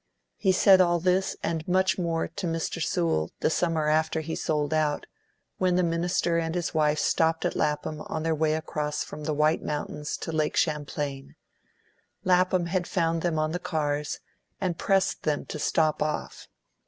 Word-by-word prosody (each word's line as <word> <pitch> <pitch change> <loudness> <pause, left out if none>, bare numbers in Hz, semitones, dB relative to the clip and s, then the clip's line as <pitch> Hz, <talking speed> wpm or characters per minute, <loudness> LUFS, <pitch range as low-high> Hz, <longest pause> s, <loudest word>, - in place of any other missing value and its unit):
He 190 - +3
said 185 0 +6
all 175 -1 +3
this, 185 +2 +1
and 160 -1 -2
much 190 +1 +2
more, 165 -2 0
to 175 +2 -5
Mr. 165 0 -2
Sewell 160 - 0
the - - +2
summer 160 -2 +1
after 160 +1 +1
he 160 +1 -5
sold 150 -2 -1
out, 155 -2 0 0.5
when 185 -1 +2
the 180 - +3
minister 170 0 +1
and 165 0 -2
his 175 -2 -2
wife 155 -1 +2
stopped 160 +2 +1
at - - 0
Lapham 150 +1 -1
on 155 - -3
their 165 0 +1
way 155 0 +1
across 150 -1 -2
from 150 0 -8
the 155 - 0
White 155 +2 +2
Mountains 150 0 -3
to - - -5
Lake 155 -1 0
Champlain; 145 -3 -2 0.9
Lapham 185 -1 +3
had 175 +1 -1
found 165 -2 0
them 170 -2 0
on 155 0 0
the 175 - -2
cars, 150 -4 -2 0.4
and 180 -4 -2
pressed 195 -1 +1
them 150 -2 -1
to 155 - -6
stop 155 0 +1
off. 150 0 -3
160 Hz, 175 wpm, -27 LUFS, 150-175 Hz, 0.9 s, said